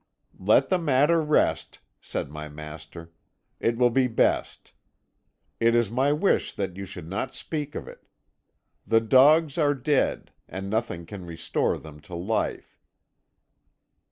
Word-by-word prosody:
"'Let 110 +8 +3
the 185 - +2
matter 150 +1 +3
rest,' 150 -1 +1 0.2
said - - -5
my 75 0 -7
master; 75 +2 -10 0.5
'it 115 0 0
will 120 0 +4
be 130 +1 +3
best. 115 - 0 0.9
It 115 0 +3
is 120 -3 +2
my 130 +4 +2
wish 155 +7 +1
that 95 -3 -4
you 100 0 -7
do 90 - -9
not 100 +10 -4
speak 150 -2 -5
of - - -6
it. - - -13 0.8
The 115 0 +4
dogs 140 +7 +4
are 145 -2 +3
dead, 140 +1 0 0.2
and 95 +3 -6
nothing 110 -7 -2
can 100 +1 -9
restore 80 -1 -1
them 75 -1 -12
to 85 +4 -10
life. 95 +6 -3
115 Hz, 140 wpm, -26 LUFS, 90-140 Hz, 0.9 s, will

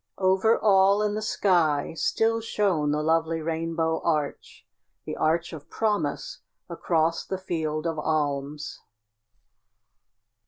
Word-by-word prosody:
Over 190 +4 +3
all 200 0 +4
in 210 -1 0
the 215 - -3
sky 170 -10 +1
still 225 +7 +1
shone 195 -9 0
the 150 +1 0
lovely 165 +1 +1
rainbow 160 0 -1
arch 150 -4 -2 0.4
the - - -4
arch 165 +2 0
of 155 0 -10
promise 220 - -2 0.3
across 165 -1 0
the 190 - -4
Field 160 -4 -3
of 165 -2 -2
Alms. 150 -1 -2
165 Hz, 115 wpm, -26 LUFS, 155-195 Hz, 0.4 s, all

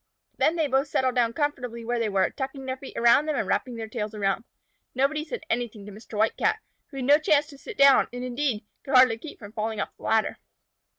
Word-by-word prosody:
Then 320 - +2
they 320 -2 +1
both 270 +1 +1
settled 260 -2 +1
down 240 -2 +2
comfortably 250 -5 -3
where 240 +1 -1
they 225 -2 0
were, 195 -2 +1
tucking 270 -1 -5
their 260 0 -2
feet 265 - -10
under 280 +6 +4
them - - -1
and - - -2
wrapping 250 -2 -1
their 225 -1 -5
tails 215 -1 -4
around. 200 +2 -1 0.5
Nobody 280 +4 +1
said 440 +4 -6
anything 235 - -3
to 210 - -9
Mr. 215 +1 -10
White 220 +1 +2
Cat, 435 0 +1 0.3
who 275 - -11
had 260 - -3
no 290 +3 +6
chance 300 -1 +3
to 280 - -12
sit 450 +5 -9
down, 275 -1 +6
and, 245 +1 -6
indeed, 250 -3 -2 0.2
could 270 - -1
hardly 255 -3 +6
keep 305 +4 -9
from 205 -2 -11
falling 220 0 -3
off - - -4
the - - -23
ladder. 220 -1 +1
250 Hz, 235 wpm, -26 LUFS, 225-285 Hz, 0.5 s, no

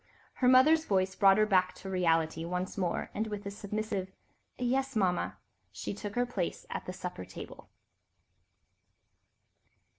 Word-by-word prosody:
Her 250 - +1
mother's 305 +6 +6
voice 190 -1 +1
brought 195 0 +6
her 215 - +5
back 185 -3 +2
to - - -10
reality 165 -3 +1
once 180 +2 -3
more, 180 -4 -2
and 215 +2 -1
with 210 -1 -5
a 200 - -3
submissive 200 -2 -3 0.5
"Yes, 265 +1 0
Mama," 185 -4 +1 0.3
she - - -5
too 200 - -10
took 205 -1 -5
her 245 0 +2
place 195 -8 -3
at - - -4
the - - -2
supper 180 - -6
table. - - -10
195 Hz, 150 wpm, -31 LUFS, 185-220 Hz, 0.5 s, mother's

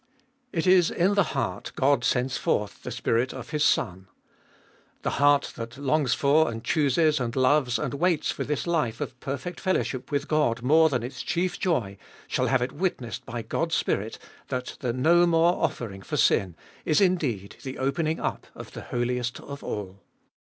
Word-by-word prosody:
It 165 0 -1
is 180 -2 +5
in 185 +4 +2
the 200 - +4 0.2
heart - - -3
God 140 0 +2
sends 130 +1 +1
forth 105 -1 -1
the - - -6
Spirit 120 +3 0
of 130 0 -8
His 150 -1 +1
Son; 95 -9 +1 1.0
the - - 0
heart 145 0 +4
that 115 +1 -7
longs 140 -2 +1
for 150 +3 +3
and 115 -1 -6
chooses 155 0 +2
and 120 -2 -3
loves 130 -2 +3
and - - -3
waits 165 +2 +1
for - - -3
this 150 0 -2
life 150 -10 0
of 130 - -5
perfect 140 +7 -5
fellowship 135 -9 -1
with 145 0 -1
God 125 -7 +1
more 160 +4 +5
than 130 -5 -1
its 125 +2 -6
chief 175 +2 -1
joy, 115 - -1 0.3
shall - - 0
have 130 -2 +2
it 125 - -3
witnessed 145 - -3
by 115 0 -4
God's 165 +6 -1
Spirit 105 +3 -1 0.3
that 125 -1 -4
the 125 - -1
no 170 +8 +4
more 170 +1 +4
offering 100 -5 -2
for - - -4
sin 90 -4 +2 0.3
is 155 - +2
indeed 145 - 0
the 130 -1 -6
opening 155 +4 0
up - - -3
of - - -10
the - - -8
Holiest 125 0 -2
of 140 0 -9
All. 100 -2 -5
135 Hz, 180 wpm, -26 LUFS, 120-160 Hz, 1.0 s, is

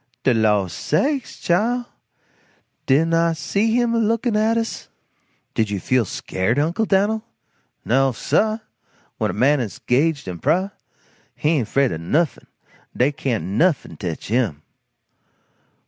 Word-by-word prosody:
"De 130 - +4
law 105 -3 +3
sakes, 260 - -1
Chile, 235 +8 +1 1.0
didn't 160 +5 +3
I 165 0 +3
see 200 - 0
him 240 -1 +2
a 230 - +2
lookin' 225 +1 +1
at 220 +2 +2
us?". 230 0 -4 0.6
"Did 110 -2 0
you 100 -1 -2
feel 125 +3 +1
scared, 95 +5 -2
Uncle 165 +9 +1
Dan'l?" 210 +2 +1 0.6
"No 135 +3 +3
sah! 215 - +1 0.6
When - - +1
a - - -2
man 135 +6 +3
is 115 -6 -4
'gaged 140 +2 0
in 90 -2 -5
prah, 185 - +1 0.6
he 150 - 0
ain't 145 -9 +1
fraid 135 -2 +2
o' - - -3
nuffin 145 - -1 0.5
dey 130 +4 +3
can't 125 - -2
nuffin 130 - 0
tetch 85 -2 -5
him." 105 - 0
150 Hz, 140 wpm, -21 LUFS, -, 1.0 s, De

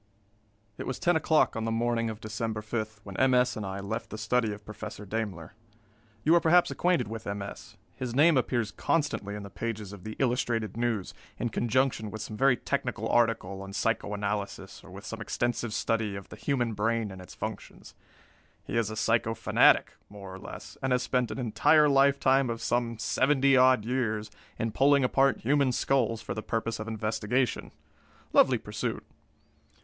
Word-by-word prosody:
_] - - -39 0.8
It - - -5
was 130 - -3
ten 175 0 +2
o'clock 160 0 +3
on 110 - -2
the 115 - -1
morning 115 0 0
of 110 -1 -6
December 110 0 -4
5 110 -1 -4
when 100 -2 -9
M. 130 -1 +4
S. 125 -1 +3
and 110 - -4
I 95 0 -4
left 110 +4 -4
the 110 - -6
study 110 +1 +1
of 105 0 -9
Professor 105 -1 -8
Daimler. 100 -6 -4 0.7
You 160 - +4
are 170 - +7
perhaps 175 +2 +4
acquainted 180 - +1
with 110 0 -7
M. 100 0 -3
S. 100 - -10 0.2
His 125 -2 -4
name 155 +3 +6
appears 120 -4 0
constantly 145 -10 -1
in 105 - -6
the 100 - -9
pages 110 -3 -5
of 100 - -11
the 110 0 -6
Illustrated 120 -5 0
News, 115 -5 -1 0.2
in 120 - -1
conjunction 120 -1 0
with 110 +1 -6
some 110 - -7
very 130 +1 +4
technical - - -2
article 115 -5 +1
on 95 0 -8
psycho 105 -1 -1
analysis 100 -2 -4
or - - -14
with 95 +3 -10
some 115 0 -6
extensive 120 +1 -2
study 110 -2 -1
of 100 - -8
the - - -9
human 125 -5 -1
brain 110 0 0
and 95 -1 -9
its 90 - -12
functions. - - -7 0.7
He - - -3
is 115 -3 +1
a 110 - -5
psycho 115 0 +1
fanatic, - - +4 0.2
more 100 -2 -10
or 95 - -8
less, - - -10
and 130 - -1
has 125 0 +1
spent 125 -3 0
an - - -5
entire 140 +6 +4
lifetime 135 -1 +4
of 115 0 -3
some 120 -1 0
seventy 135 +4 +3
odd 130 -4 +5
years 110 -4 -1 0.3
in 115 0 -1
pulling 140 +4 +4
apart 135 +1 +2
human 140 +1 +2
skulls 120 -3 0
for - - -4
the 110 - -4
purpose 115 0 -2
of 110 - -5
investigation. 110 +3 -1 0.6
Lovely - - +5
pursuit! - - -4
115 Hz, 185 wpm, -28 LUFS, 105-130 Hz, 0.8 s, are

